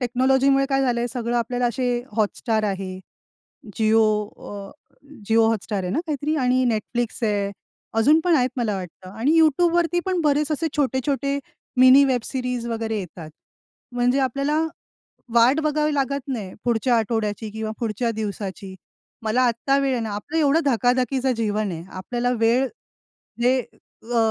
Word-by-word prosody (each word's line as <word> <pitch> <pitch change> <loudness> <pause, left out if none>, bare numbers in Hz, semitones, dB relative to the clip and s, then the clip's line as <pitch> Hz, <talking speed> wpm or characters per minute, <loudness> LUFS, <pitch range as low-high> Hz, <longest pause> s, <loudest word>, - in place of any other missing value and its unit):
टेक्नॉलॉजीमुळे 265 +2 +3
काय 270 0 +1
झालं 240 -2 +1
सगळं 240 -1 -2
आपल्याला 245 +1 0
असे, 245 0 -1
हॉटस्टार 220 +1 0
आहे, 190 -2 -3 0.8
जिओ 220 0 +4 0.3
अ, 200 -1 -9 0.6
जिओ 225 0 +4
हॉटस्टार 205 -3 -2
आहे 180 - -3
ना 310 - +1
काहीतरी? 300 +1 -1
आणि 255 -2 +2
Netflix 230 +2 -2
आहे, 200 -2 0 0.5
अजून 300 +8 +5
पण 350 -2 +3
आहेत 255 -2 +2
मला 220 -4 0
वाटतं 185 0 -8
आणि 225 +9 0
YouTubeवरती 340 +2 +3
पण 370 -1 0
बरेच 300 0 +1
असे 320 +2 0
छोटे-छोटे 275 +1 0 0.4
मिनी 260 +2 +8
वेब 250 -3 +1
सीरीज 250 -2 -3
वगैरे 225 -1 -2
येतात. 165 -3 -8 0.6
म्हणजे 245 +2 +1
आपल्याला 275 +4 0 0.8
वाट 250 +6 +5
बघावी 300 0 0
लागत 280 0 -1
नाही, 215 -8 -4
पुढच्या 240 +1 +2
आठवड्याची 220 -1 -2
किंवा 220 +1 -4
पुढच्या 230 +1 -1
दिवसाची. 200 -3 -5 0.5
मला 225 +3 +1
आत्ता 255 +4 +1
वेळ 275 -1 +1
आहे 245 - 0
ना, 220 - -4
आपलं 290 +10 -5
एवढं 305 +1 +3
धकाधकीचं 255 +1 +1
जीवन 215 -3 -1
आहे. 165 0 -6
आपल्याला 240 +6 -2
वेळ 235 +4 +3 0.8
जे 255 +2 +3 0.4
अ, 235 +1 -2
245 Hz, 145 wpm, -23 LUFS, 220-275 Hz, 0.8 s, मिनी